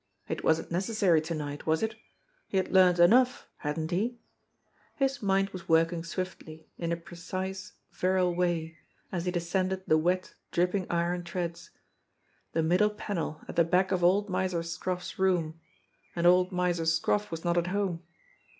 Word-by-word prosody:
It - - -4
wasn't 160 +1 +1
necessary 185 -2 +2
to 160 +1 -4
night, 145 -1 -5
was 160 +4 +2
it? 220 0 0 0.5
He 195 - -1
had 190 - 0
learned 185 -2 +6
enough, 245 +9 +5
hadn't 155 +2 -3
he? 225 +7 0 0.8
His 270 -1 0
mind 195 -1 +1
was 185 -3 -9
working 165 +1 +3
swiftly, 170 -3 -6
in 170 -1 -2
a 170 - 0
precise, 185 +3 -6 0.2
virile 185 -1 +1
way, 170 -2 -1 0.3
as 175 -2 -2
he 180 - 0
descended 185 +2 -1
the 155 - +4
wet, 180 +3 0 0.2
dripping 180 +2 0
iron 175 +1 0
treads. 170 -1 -4 0.8
The 165 - +1
middle 180 +6 +3
panel 200 -7 -4
at - - -7
the 170 - +5
back 180 +3 +2
of 180 -2 +1
old 195 +4 +4
Miser 185 -3 -1
Scroff's 180 +3 -4
room 170 -4 +1 0.6
and 170 0 -1
old 180 +1 +5
Miser 180 -2 0
Scroff 185 +6 +1
was 165 +1 -6
not 170 0 +2
at 170 - -2
home. 185 -3 -1
180 Hz, 160 wpm, -29 LUFS, 165-190 Hz, 0.8 s, learned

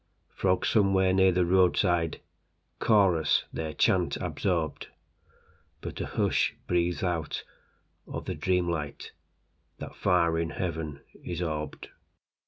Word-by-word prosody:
Frogs 95 -1 +1
somewhere 95 -3 +3
near 95 0 +5
the 90 0 +2
roadsideChorus 90 0 +1
their 80 -1 -3
chant - - +2
absorbed:But 85 -6 -6
a - - -3
hush - - +1
breathes 90 0 0
out 85 -4 -2 0.6
of - - -6
the - - -3
dream 90 -1 +1
lightThat 80 -4 -8
far 85 -2 +2
in 85 0 -1
heaven 80 -5 -4 0.2
is 85 -2 -4
orbed. 75 -2 -4
85 Hz, 100 wpm, -28 LUFS, 80-95 Hz, 0.6 s, near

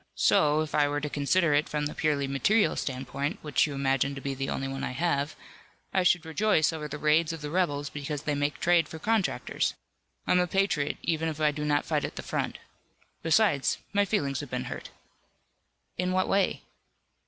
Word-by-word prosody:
So, 150 0 +3
if 155 - -4
I 145 -1 +4
were 145 0 -1
to 150 0 -4
consider 150 +3 +2
it 145 +1 +2
from 150 -1 -1
the 150 - -3
purely 145 -3 0
material 200 +11 +2
standpoint, 135 +4 -3
which 150 0 +2
you 145 - -5
imagine 135 0 +1
to - - -5
be 140 0 -3
the 135 0 -3
only 135 - -2
one 135 0 -4
I - - -3
have, 145 -1 0 0.6
I 190 - +3
should 175 -1 +3
rejoice 160 -1 +2
over 155 -2 -4
the 150 0 -6
raids 155 +2 +3
of 165 - -7
the 150 0 -5
rebels 145 -6 0
because 145 0 -4
they 150 - 0
make 145 0 -1
trade 175 -1 +3
for 160 - -7
contractors. 215 +3 0 0.5
I'm 180 - +3
a 180 - +2
patriot, 180 -6 0
even 165 -1 0
if 155 -1 -6
I 150 -1 +3
do 150 0 -5
not 145 0 +1
fight 150 -2 0
at - - -4
the - - -6
front. - - -2 0.6
Besides 165 -3 +3 0.2
my 205 0 +4
feelings 140 -10 0
have - - -6
been - - -2
hurt." - - -9 1.1
"In 180 0 0
what 185 0 +2
way?" 195 -1 +1
150 Hz, 200 wpm, -28 LUFS, 145-170 Hz, 1.1 s, I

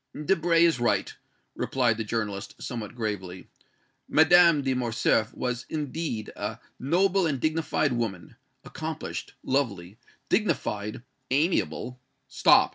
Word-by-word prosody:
"Debray 170 -1 +3
is 165 -6 +2
right," 120 - +1 0.4
replied 125 -4 +1
the 110 - -3
journalist, 105 -2 -3
somewhat 115 -4 -6
gravely. 95 -6 -4 0.6
"Madame 165 -1 +6
de 135 -1 +1
Morcerf 115 -2 +1
was, 125 -1 -3
indeed, 150 -6 -3
a - - -4 0.2
noble 185 +5 +2
and 140 -4 -1
dignified 155 -2 0
woman 110 -8 -3 0.3
accomplished, - - -6
lovely, 105 -7 -1 0.3
dignified, 120 - -1 0.3
amiable 135 -4 0 0.2
" - - -48
"Stop! - - +6
125 Hz, 115 wpm, -27 LUFS, 110-160 Hz, 0.6 s, Madame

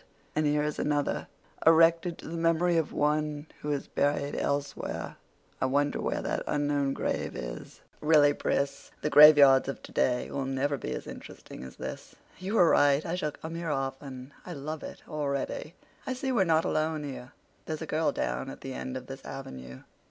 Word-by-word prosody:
And 155 0 +2
here 150 0 +2
is 150 0 -2
another 145 -1 0 0.4
'erected 165 +1 +5
to - - -10
the 165 - -5
memory 165 +1 +2
of 165 -2 +1
one 150 0 0 0.2
who 150 - -2
is 140 -1 -2
buried 145 0 0
elsewhere.' 140 0 -3 0.4
I 130 - +3
wonder 145 +2 +1
where - - -2
that - - -1
unknown 145 -2 +1
grave - - -2
is. - - -7 0.2
Really, 150 -2 +5
Pris, 140 -1 -2
the 150 - 0
graveyards 145 -3 +8
of 135 - -5
today 125 -1 0
will 140 -1 -2
never 135 +2 0
be 130 - -5
as - - -5
interesting - - -10
as 65 - -10
this. - - -7 0.2
You 190 +4 -3
were 175 -6 +6
right—I 145 +4 +3
shall 175 -4 -1
come 160 +1 -8
here 165 0 -4
often. 135 -1 -4
I 180 - -7
love 155 +1 -5
it - - -9
already. 150 +1 -3 0.3
I 260 - 0
see 265 +1 -2
we're 200 -7 +3
not 160 -1 +3
alone 155 0 0
here—there's 145 +3 -8
a - - -4
girl 155 0 +1
down 135 - -2
at - - -9
the 135 - -6
end 130 0 -4
of 130 - -8
this 135 +1 -9
avenue." 65 - -8
145 Hz, 180 wpm, -29 LUFS, 135-160 Hz, 0.4 s, graveyards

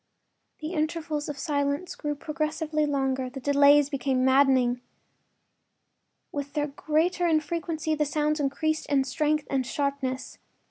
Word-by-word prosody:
The 310 +3 -4
intervals 310 -2 -2
of 290 - -5
silence 285 +3 -1
grew 295 -1 -3
progressively 305 0 -2
longer; 265 -2 0
the 270 +2 -8
delays 285 +1 +5
became 265 -2 0
maddening. 260 -2 +4 1.5
With 285 -1 -5
their 295 -1 0
greater 315 +5 0
infrequency 315 0 -1
the 300 -1 +1
sounds 300 +1 0
increased 315 +3 -1
in 280 -2 +2
strength 300 +3 0
and 270 -1 0
sharpness. 280 -1 -3
290 Hz, 125 wpm, -27 LUFS, 275-310 Hz, 1.5 s, delays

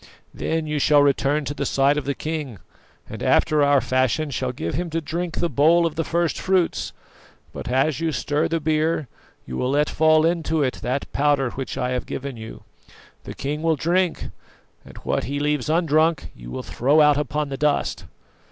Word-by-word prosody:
Then 160 -1 -2
you 150 -1 -2
shall 145 0 +5
return 140 +1 +1
to 140 - -3
the 145 - -3
side 140 +1 +2
of 150 - -3
the 140 0 -1
king, 150 -8 -4 0.5
and - - -8
after 155 -1 +3
our 145 -1 +4
fashion 130 +4 0
shall 130 -1 -2
give 85 -9 -4
him 170 +5 -2
to 165 +1 -1
drink 170 +2 -4
the 170 - 0
bowl 165 +4 +4
of 165 - -1
the 165 +1 -1
first 170 +1 -1
fruits; 185 -3 0 0.6
but - - -7
as 135 +5 +1
you 165 -1 0
stir 145 +3 0
the 165 0 -1
beer, 155 -1 0 0.4
you 65 - -6
will 125 - -1
let 145 +2 +1
fall 155 0 +4
into 160 -2 +1
it 130 - -2
that 130 +3 -2
powder 140 -3 +2
which 135 -1 -5
I 125 -1 -1
have 125 -1 -3
given 135 -1 -5
you. 110 -1 -10 0.6
The - - -7
king 145 +3 -3
will 165 0 +2
drink, 175 +4 0 0.5
and - - -14
what - - -1
he 140 +4 -3
leaves 150 -2 -1
undrunk 160 -1 +2
you - - -11
will 60 - -5
throw 140 +6 +2
out 150 -1 +5
upon 150 +1 -2
the 135 - -3
dust. 150 0 0
150 Hz, 195 wpm, -23 LUFS, 135-160 Hz, 0.6 s, shall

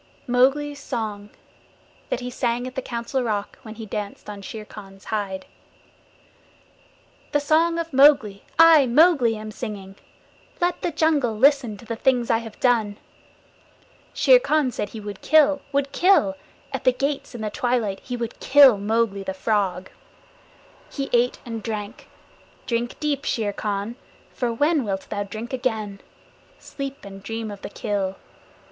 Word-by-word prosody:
Mowgli's 275 +4 +2
Song 215 -7 -4 0.8
THAT 240 - -2
HE 250 - -4
SANG 245 -1 -1
AT 255 - -6
THE 265 - -3
COUNCIL 240 +2 -3
ROCK 210 -4 -3
WHEN 220 -3 -10
HE 225 0 -8
DANCED 210 0 -6
ON 200 -1 -9
SHERE 215 +2 -8
KHAN'S 195 -2 -13
HIDE 195 -3 -3 1.9
The 290 - +4
Song 320 +3 +2
of 330 -2 -4
Mowgli 265 -8 +5
I, 320 -4 +7
Mowgli, 270 -3 +4
am 215 0 -7
singing. 205 -4 -7 0.6
Let 350 0 0
the - - 0
jungle 295 -8 +1
listen 260 -4 +3
to 235 - -14
the 230 +1 -4
things 245 0 +1
I 225 - +3
have 225 -2 -10
done. 225 -5 +2 1.1
Shere - - +5
Khan 310 - +1
said 210 - -4
he 220 - -8
would 205 -2 -8
kill 295 -1 +4
would 280 -1 0
kill! 345 - +3 0.4
At 265 - -3
the 255 - +4
gates 275 0 -3
in 235 - -6
the 215 -1 -3
twilight 230 -5 -1
he 250 -1 -6
would 235 -1 -5
kill 270 -6 +6
Mowgli, 210 -1 0
the 190 0 -5
Frog! 190 -3 0 1.0
He 275 -1 -4
ate 245 +1 +3
and 230 -2 -5
he - - -7
drank. 210 +1 -6 0.6
Drink 240 0 -2
deep, 290 -2 -1
Shere 210 -3 -1
Khan, 205 +3 -3 0.4
for 245 -2 -1
when 295 +5 +2
wilt 195 -3 -4
thou 205 - -2
drink 220 +5 -6
again? 220 -6 -2 0.6
Sleep 275 -4 -7
and 195 0 -10
dream 225 +1 -5
of 200 - -9
the - - -6
kill. 195 -2 -2
235 Hz, 155 wpm, -23 LUFS, 210-275 Hz, 1.9 s, I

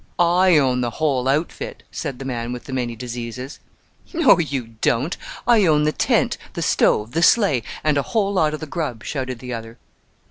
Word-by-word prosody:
"I 175 0 +4
own 130 -3 +2
the 120 - 0
whole 135 -5 +1
outfit," 150 +5 -2
said 140 -5 -4
the 135 - -7
man 120 -2 -3
with 125 -1 -6
the 135 - -8
many 120 -2 -2
diseases. 120 +2 -6 0.5
"No, 330 - +5
you 140 -8 -2
don't; 140 +9 +1 0.3
I 225 -6 +5
own 150 -1 +4
the 155 - +2
tent, - - +1
the - - -3
stove, 105 +2 +2
the 165 - 0
sleigh, 170 - +4 0.2
and 150 -2 +2
a - - -4
whole 200 -2 +2
lot 155 -5 +2
of 155 - -10
the - - -4
grub," 145 -7 -4
shouted 130 -4 -4
the 125 +1 -7
other. 115 0 -7
135 Hz, 190 wpm, -21 LUFS, 125-160 Hz, 0.5 s, No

